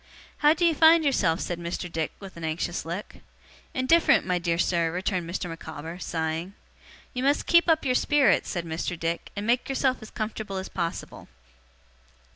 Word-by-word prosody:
'How 300 +2 +5
do 350 - +1
you 335 - +4
find 320 +1 +6
yourself?' 175 - +2
said 175 -1 -3
Mr. 170 +1 -4
Dick, 160 -2 -3
with 195 -2 -10
an 170 - -9
anxious 160 +2 -2
look. 175 +5 -6 0.6
'Indifferent, 295 +7 +4
my 180 -1 0
dear 170 -1 0
sir,' 170 -1 +1
returned 180 -1 -2
Mr. 180 +1 -3
Micawber, 165 0 -7
sighing. 165 +2 -3 0.6
'You 250 - -3
must 280 +2 +2
keep 340 0 +4
up 320 -2 +3
your 255 - +2
spirits,' 290 +1 +3
said 175 -3 -3
Mr. 165 +1 -3
Dick, 165 +1 -2
'and 205 +1 -4
make 245 +3 +1
yourself 265 -1 +1
as 220 - -10
comfortable 215 -2 -4
as 190 - -5
possible. 170 -2 -5
185 Hz, 175 wpm, -26 LUFS, 170-260 Hz, 0.6 s, find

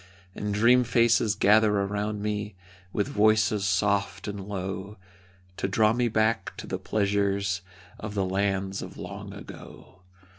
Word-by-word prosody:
And 105 +2 -4
dream 120 +5 +5
faces 115 -2 +3
gather 105 0 +4
around 105 +1 -2
me, 105 -1 -3 0.4
With 105 - -1
voices 110 -3 +2
soft 100 0 0
and 100 -1 -5
low, 95 +1 -5 0.6
To - - -1
draw 110 +3 +3
me 120 +1 +1
back 110 0 0
to - - -7
the - - -4
pleasures 100 -2 0 0.4
Of 105 -1 -6
the 100 -2 +1
lands 95 0 -1
of - - -9
long - - -7
ago. 90 - -12
105 Hz, 140 wpm, -27 LUFS, 100-110 Hz, 0.6 s, dream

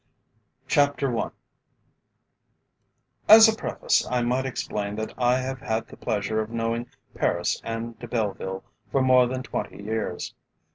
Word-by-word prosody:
CHAPTER 145 -4 +2
I - - -1 2.0
As 220 +1 +11
a 220 - +2
preface, - - 0
I 125 -1 +1
might 125 +2 0
explain 105 -5 -3
that 110 0 -4
I 125 0 +2
have 130 0 -3
had 110 0 -2
the - - -11
pleasure 110 -1 -1
of 110 - -5
knowing 115 +1 -2 0.3
Paris 85 0 0
and 115 0 -5
De 120 - -8
Belleville 100 -4 -3 0.3
for 135 - +2
more 130 -1 +5
than 130 +1 -4
twenty 100 - -5
years. 110 +1 -3
120 Hz, 140 wpm, -25 LUFS, 110-130 Hz, 2.0 s, As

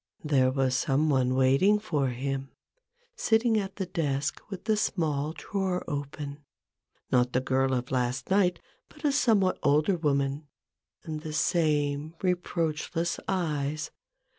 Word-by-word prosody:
There 135 -4 +3
was 130 -1 +1
some 145 +4 +2
one 130 -2 +2
waiting 135 +11 +4
for 155 -10 -1
him, 135 +2 -3 0.7
sitting 225 0 +2
at 195 -1 -5
the 195 - -3
desk 155 -5 -2
with 195 -3 -7
the 220 - +2
small 155 -8 0
drawer 190 0 -2
open: 145 0 -5 0.7
not 125 -1 +3
the 125 - +3
girl 130 0 +1
of 125 0 -3
last 125 +3 -1
night, 180 -3 +3 0.3
but - - -10
a 290 - +4
somewhat 220 -9 +3
older 155 +7 +3
woman 140 -1 0 0.3
— - - -49
and 155 -3 -5
the 155 -1 -6
same 150 -2 +1
reproachless 170 -2 -1
eyes. 155 -4 -1
150 Hz, 140 wpm, -28 LUFS, 135-180 Hz, 0.7 s, waiting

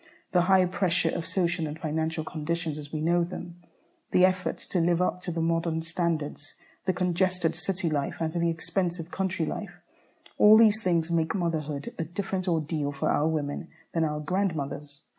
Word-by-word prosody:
The 180 0 +3
high 190 -1 +6
pressure 180 -2 +1
of 165 - -2
social 170 -3 0
and 150 +1 -6
financial 160 0 -1
conditions, 160 0 -3
as 145 0 -9
we 155 - -3
know 170 +2 +3
them, 175 0 -7 0.5
the 180 - +5
effort 185 -3 0
to 180 - -2
live 170 0 +3
up 180 0 0
to 180 - -4
the 165 -1 -1
modern 165 -1 0
standards, 165 -3 -2 0.3
the - - +5
congested 180 -1 +1
city 190 -2 -2
life 145 -3 -1
and 160 -1 -1
the 170 -1 +1
expensive 170 0 -2
country 190 -3 -1
life, 185 -1 -5 0.6
all 210 +1 +9
these 220 -1 +5
things 170 -4 +1
make 165 +4 +1
motherhood 155 -5 -2
a - - +1
different 185 +2 -3
ordeal 155 -3 0
for 140 - 0
our 150 - +2
women 155 +1 -2 0.3
than 165 - +2
our 150 -1 -1
grandmothers. 150 -5 -2
170 Hz, 175 wpm, -28 LUFS, 160-180 Hz, 0.6 s, all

